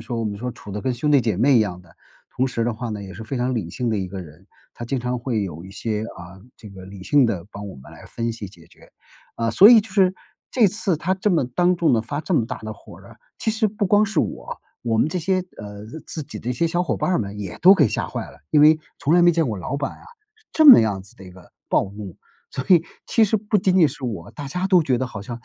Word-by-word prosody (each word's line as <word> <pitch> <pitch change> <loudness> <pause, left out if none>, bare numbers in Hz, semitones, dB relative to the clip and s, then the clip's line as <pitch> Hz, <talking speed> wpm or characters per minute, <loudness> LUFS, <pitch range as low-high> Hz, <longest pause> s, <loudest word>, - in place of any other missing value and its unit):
说 120 -1 -3
我 115 - -2
们 100 -1 -3
说 125 +2 -4
处 105 -4 -11
得 105 - -4
跟 130 -1 -1
兄 150 +5 -1
弟 140 - +6
姐 110 -6 -1
妹 130 +4 +4
一 - - +4
样 90 -4 -2
的， 85 -2 -21 0.4
同 130 +1 +1
时 115 -2 -2
的 120 - 0
话 120 +2 -6
呢， 105 -2 -5
也 95 -1 -9
是 110 +5 -9
非 120 +4 -5
常 125 +1 -1
理 100 -8 -3
性 120 +2 -2
的 105 - 0
一 95 -1 -3
个 95 0 -7
人。 85 +3 -14 0.3
他 120 - -6
经 130 +2 -2
常 125 +1 -2
会 115 -4 -2
有 85 -3 -6
一 95 - -11
些 110 +1 -3
啊， 90 +2 -12 0.2
这 105 - -12
个 95 -1 -12
理 95 -1 -11
性 145 -3 +4
地 95 -5 -3
帮 100 0 -7
我 95 - -10
们 65 - -14
来 - - -14
分 115 0 -3
析 105 -4 -7
解 85 -4 -18
决。 - - -21 0.5
啊， 115 0 0
所 200 - +8
以 235 -2 +8
就 215 0 -11
是 190 -2 +3 0.4
这 235 -5 +4
次 195 -3 0
他 180 +4 -1
这 195 +2 0
么 160 -7 +2
当 175 +8 +1
众 165 -5 +2
地 115 - +3
发 145 +5 -4
这 185 - -4
么 115 -6 +2
大 - - -5
的 110 0 -7
火 100 - -14
儿 - - -16
啊， - - -16 0.2
其 220 - 0
实 215 -1 +1
不 205 -1 -2
光 205 +3 +4
是 215 - -2
我， - - -3 0.2
我 115 -2 0
们 150 - +3
这 180 - -4
些 185 +3 0 0.2
呃， 105 0 -9 0.2
自 155 -3 -5
己 105 - -8
的 120 - -4
一 - - +1
些 165 +7 0
小 175 +2 0
伙 120 - -2
伴 95 - -2
儿 - - +2
们 100 0 -6
也 95 -4 -6
都 185 +2 +9
给 150 - +4
吓 - - -3
坏 - - -5
了。 - - -16
因 150 - +4
为 155 +1 +7 0.2
从 145 +3 +1
来 175 - +5
没 175 - +6
见 165 -3 +1
过 110 -3 -3
老 115 +10 -4
板 140 -1 -3
啊， - - -17 0.5
这 315 - +4
么 270 - +11
样 105 -4 0
子 95 - -16
的 - - -14
一 90 - -11
个 90 0 -17 0.2
暴 - - +2
怒。 100 -4 -9 0.3
所 130 - -5
以 175 -3 +5 0.2
其 225 - +2
实 220 +2 +1
不 210 +1 0
仅 185 -1 +1
仅 165 - +6
是 135 0 -9
我， 105 -9 -5
大 145 -2 -7
家 180 +6 -2
都 185 -3 +4
觉 130 -5 0
得 130 - -1
好 105 -5 -8
像， 115 +2 -7
120 Hz, 315 characters per minute, -22 LUFS, 105-170 Hz, 0.5 s, 么